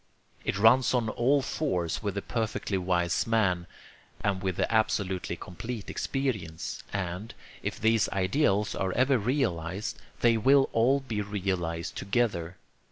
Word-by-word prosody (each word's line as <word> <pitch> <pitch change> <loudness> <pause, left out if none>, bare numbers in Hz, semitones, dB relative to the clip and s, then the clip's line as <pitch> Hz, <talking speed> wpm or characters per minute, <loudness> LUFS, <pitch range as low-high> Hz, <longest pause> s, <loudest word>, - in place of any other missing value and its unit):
It - - -1
runs 120 +5 +5
on 115 -3 +1
all 135 +5 +2
fours 90 - -1
with 100 -3 -2
the 100 - -3
perfectly 110 -4 -2
wise 90 0 +1
man, 95 -6 +1 0.5
and 100 -3 0
with 95 -2 -1
the - - 0
absolutely 95 -5 0
complete 105 +6 -6
experience; 110 - -3
and, 95 +2 -4 0.3
if - - -4
these 110 0 +3
ideals 100 +2 +1
are 95 -1 -1
ever 130 +1 +3
realized, 100 - -1 0.2
they 115 -1 +5
will 135 +4 +4
all 130 +5 +3
be 115 -6 -3
realized 95 -5 -2
together. 95 -5 -1
105 Hz, 135 wpm, -28 LUFS, 90-120 Hz, 0.5 s, runs